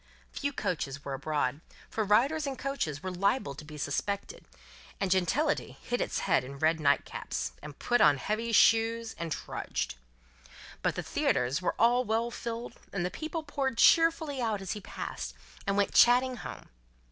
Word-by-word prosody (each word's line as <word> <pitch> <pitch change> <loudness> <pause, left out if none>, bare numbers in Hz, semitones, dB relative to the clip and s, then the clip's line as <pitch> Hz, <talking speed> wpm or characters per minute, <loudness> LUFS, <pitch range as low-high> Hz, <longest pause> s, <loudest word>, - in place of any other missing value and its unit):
Few 285 -1 -2
coaches 145 - -3
were 140 - -3
abroad, 145 0 -1 0.3
for 220 - -1
riders 270 +9 +3
in 275 - -2
coaches 255 - -3
were 185 - -3
liable 195 - 0
to 145 - -10
be 150 0 -10
suspected, 200 - -3 0.5
and 195 -2 0
gentility 200 - +1
hid 245 - -2
its - - -1
head - - +2
in 140 +2 -8
red 160 +3 +2
nightcaps, 145 -2 0
and 150 -1 -9
put 245 0 +1
on 145 - +6
heavy 215 +9 -2
shoes, 225 +1 +4
and 170 -1 -4
trudged. - - -3 0.9
But, - - 0
the - - -3
theatres 125 +6 0
were 180 - 0
all 240 +2 +4
well 230 +1 0
filled, 235 0 -5 0.2
and 185 -3 -1
the 180 - -2
people 320 +1 -4
poured 275 -4 -2
cheerfully 320 -4 +4
out 220 -3 0
as 195 -1 -5
he 210 - -4
passed, - - -6 0.3
and 200 0 +1
went 200 - +2
chatting 250 +1 +5
home. - - -8
215 Hz, 170 wpm, -30 LUFS, 155-250 Hz, 0.9 s, on